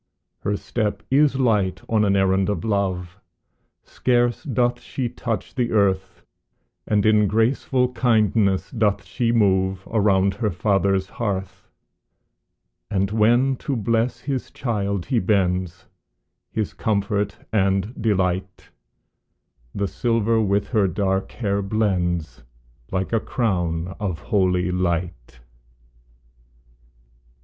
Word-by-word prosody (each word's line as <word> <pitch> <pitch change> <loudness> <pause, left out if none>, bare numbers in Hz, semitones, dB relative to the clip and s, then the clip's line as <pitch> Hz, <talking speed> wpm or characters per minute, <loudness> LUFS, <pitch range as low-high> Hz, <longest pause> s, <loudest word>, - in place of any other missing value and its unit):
Her 100 0 -1
step 105 -1 -2
is 140 0 +4
light 105 -8 +1
on 110 -2 +2
an 100 -1 +2
errand 95 0 +2
of 105 - -2
love, 95 -4 -2 0.6
Scarce 120 -1 +1
doth 125 -5 0
she 130 0 -3
touch 115 -3 -4
the 125 -3 -1
earth, 95 -3 0 0.6
And 105 -1 +2
in 105 -1 +4
graceful 125 +4 +1
kindness 110 -5 +2
doth 105 -4 0
she 120 -2 -1
move 95 -4 +2
Around 100 -3 +2
her 105 +2 -1
father's 95 +1 +1
hearth; 95 -4 -4 1.2
And 100 -1 0
when 120 +5 +3
to 140 - -3
bless 115 +2 0
his 135 -2 -3
child 100 -6 -2
he 125 - +1
bends, 90 -3 0 0.7
His 110 -2 -2
comfort 100 -1 -1 0.2
and 100 +1 +1
delight, 95 -4 -1 1.1
The 100 0 0
silver 115 0 +1
with 100 -1 0
her 105 -5 +2
dark 95 +1 -1
hair 100 -4 -1
blends, 90 - -1 0.5
Like 95 +3 -2
a 115 - +3
crown 90 -7 -1
of 95 -5 -2
holy 90 -2 +1
light. 85 -9 -3
100 Hz, 110 wpm, -22 LUFS, 95-115 Hz, 1.2 s, is